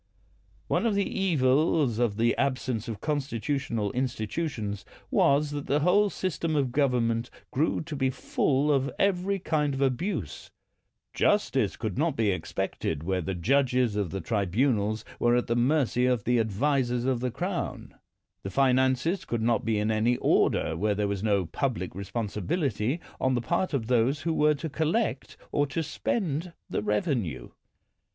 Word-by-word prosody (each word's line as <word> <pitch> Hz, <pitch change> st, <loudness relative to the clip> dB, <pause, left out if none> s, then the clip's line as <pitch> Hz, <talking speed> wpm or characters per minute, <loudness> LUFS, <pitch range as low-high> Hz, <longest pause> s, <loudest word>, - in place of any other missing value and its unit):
One -, -, +1 dB
of 215 Hz, -, +1 dB
the 200 Hz, -, +1 dB
evils 145 Hz, -, +2 dB
of 115 Hz, -4 st, +1 dB
the 115 Hz, +1 st, +2 dB
absence 130 Hz, -4 st, -1 dB
of 110 Hz, -3 st, -5 dB
constitutional 135 Hz, -6 st, -2 dB
institutions 120 Hz, -, -3 dB, 0.3 s
was 145 Hz, +1 st, +3 dB
that 145 Hz, -1 st, -5 dB
the 145 Hz, +2 st, +2 dB
whole 200 Hz, +6 st, +4 dB
system 170 Hz, -4 st, -2 dB
of 140 Hz, -3 st, +1 dB
gov 140 Hz, 0 st, +2 dB
ernment 115 Hz, 0 st, 0 dB, 0.2 s
grew 150 Hz, +5 st, +1 dB
to 155 Hz, -1 st, -6 dB
be 135 Hz, -2 st, +1 dB
full 135 Hz, +2 st, +1 dB
of 140 Hz, -1 st, +2 dB
every 195 Hz, 0 st, +1 dB
kind 150 Hz, -5 st, 0 dB
of 135 Hz, -, -3 dB
abuse. 130 Hz, -, -2 dB, 0.6 s
Justice -, -, +2 dB
could -, -, -3 dB
not -, -, +1 dB
be 110 Hz, -3 st, +2 dB
expected 90 Hz, -3 st, -3 dB
where 95 Hz, +1 st, 0 dB
the 95 Hz, +3 st, -3 dB
judges 125 Hz, +3 st, +2 dB
of 100 Hz, -4 st, -1 dB
the 95 Hz, +4 st, -4 dB
tribunals 105 Hz, -, 0 dB
were 120 Hz, 0 st, +3 dB
at 125 Hz, -, +1 dB
the 115 Hz, -, 0 dB
mercy 125 Hz, -1 st, +2 dB
of 125 Hz, -4 st, +1 dB
the 125 Hz, 0 st, +2 dB
ad 110 Hz, -1 st, +1 dB
visers 125 Hz, +1 st, 0 dB
of 130 Hz, -2 st, +1 dB
the 125 Hz, +1 st, -1 dB
Crown. -, -, -4 dB, 0.5 s
The 95 Hz, -, -5 dB
finances 130 Hz, -, +2 dB
could 115 Hz, -2 st, -2 dB
not 115 Hz, -2 st, +2 dB
be 110 Hz, -1 st, 0 dB
in 105 Hz, +1 st, +1 dB
any 115 Hz, +3 st, +2 dB
order 80 Hz, -, +2 dB
where 105 Hz, +5 st, 0 dB
there 105 Hz, 0 st, 0 dB
was 100 Hz, -1 st, -2 dB
no 100 Hz, -4 st, +1 dB
public 110 Hz, -, -2 dB
responsi 100 Hz, +2 st, -4 dB
bility 130 Hz, -, 0 dB, 0.2 s
on 130 Hz, -1 st, +2 dB
the -, -, +1 dB
part 170 Hz, +9 st, 0 dB
of 135 Hz, -7 st, -1 dB
those 125 Hz, +4 st, +2 dB
who 165 Hz, -, 0 dB
were 150 Hz, -1 st, +3 dB
to 160 Hz, +3 st, -5 dB
collect 160 Hz, -, -1 dB
or 145 Hz, 0 st, +1 dB
to 160 Hz, +4 st, -2 dB
spend 165 Hz, -, -2 dB, 0.2 s
the -, -, 0 dB
revenue. 105 Hz, -, -1 dB
125 Hz, 165 wpm, -27 LUFS, 110-145 Hz, 0.6 s, whole